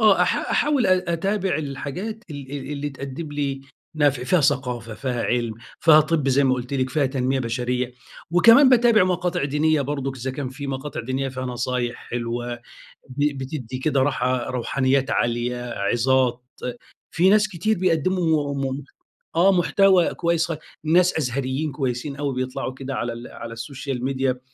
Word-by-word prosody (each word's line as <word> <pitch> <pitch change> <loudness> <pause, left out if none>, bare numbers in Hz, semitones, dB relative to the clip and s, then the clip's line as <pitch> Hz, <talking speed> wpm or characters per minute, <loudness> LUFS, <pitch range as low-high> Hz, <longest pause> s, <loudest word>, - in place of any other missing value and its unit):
آه 215 -3 +5
أح - - +2
أحاول 290 -7 +2
أ 185 -2 +2
أتابع 190 0 0
الحاجات 155 - -5
ال 140 -3 -8
ال 140 0 -5
اللي 145 0 -3
تقدم 140 +3 -7
لي 140 -2 -2 0.3
نفع، 145 -4 +2
فيها 175 +7 +3
ثقافة، 125 -5 0
فيها 125 +1 -2
علم، 120 -2 0 0.3
فيها 155 -2 +7
طِب 155 -2 0
زي 135 +1 +3
ما 130 -1 +3
قُلت 125 +2 -5
لِك، 130 -1 0
فيها 145 0 +2
تنمية 130 0 0
بشرية، 125 +1 -2 0.4
وكمان 230 +10 +7
باتابع 235 -5 +5
مقاطع 180 -3 0
دينية 150 +2 +2
برضه 135 -1 -2
إذا 130 +1 -3
كان 130 0 -4
في 135 +2 -7
مقاطع 135 +1 -4
دينية 130 +3 -2
فيها 130 0 -5
نصايح 125 -1 -2
حلوة، 120 0 -3 0.5
ب 145 +2 -1
بتدّي 130 -2 -5
كده 140 +1 +1
راحةK 125 -2 -1
روحانيات 130 +2 0
عالية، 120 +1 0 0.2
عِظات، 125 +4 +1 0.7
في 180 +3 +3
ناس 210 0 +4
كتير 195 +3 -1
بيقدموا 165 -4 +1
م 135 0 -2 0.5
آه 190 +3 +5
محتوى 185 0 +4
كويس 170 0 +1
خا 165 -3 -4 0.3
ناس 175 +3 +4
أزهريين 135 +2 -2
كويسين 135 0 -3
أوي 140 -1 -2
بيطلعوا 130 0 -3
كده 135 0 -6
على 120 +1 -4
على 115 0 -8
السوشيال 125 +2 -5
ميديا 130 -1 0
135 Hz, 155 wpm, -23 LUFS, 125-160 Hz, 0.7 s, فيها